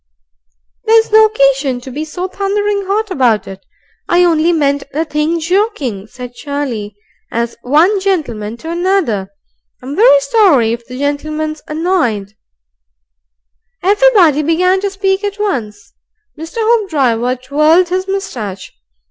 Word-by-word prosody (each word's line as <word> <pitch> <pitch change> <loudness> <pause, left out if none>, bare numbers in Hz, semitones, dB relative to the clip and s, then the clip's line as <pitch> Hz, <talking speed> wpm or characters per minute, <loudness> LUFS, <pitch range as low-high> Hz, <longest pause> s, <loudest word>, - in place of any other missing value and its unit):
"There's 445 0 +3
no 435 0 +7
occasion 275 - +1
to 260 - -9
be 295 +5 -4
so 355 +4 -5
thunderin' 400 +1 -2
'ot 420 +1 -1
about 235 - +1
it. 195 0 -10 0.5
I 350 +1 +4
only 335 -1 +3
meant 285 -4 +1
the 315 +4 -1
thing 310 +2 -1
joking," 325 - -1
said 250 +1 -9
Charlie. 245 -8 -5 0.4
"AS 235 0 -2
one 320 - +3
gentleman 240 - -2
to 320 +7 -7
another, 340 - 0 0.5
I'm 265 +3 -7
very - - +6
sorry 400 - +3
if 235 0 -7
the 250 - -8
gentleman's 305 +2 -3
annoyed 305 - -1 0.8
" - - -50
Everybody 390 - +4
began 365 +5 +1
to 400 - -1
speak 390 0 -1
at 405 0 -3
once. 215 - -4 0.4
Mr. 325 +7 -9
Hoopdriver 285 - +1
twirled 305 +7 +2
his 370 +1 -2
moustache. 235 - -5
310 Hz, 130 wpm, -14 LUFS, 250-390 Hz, 0.8 s, no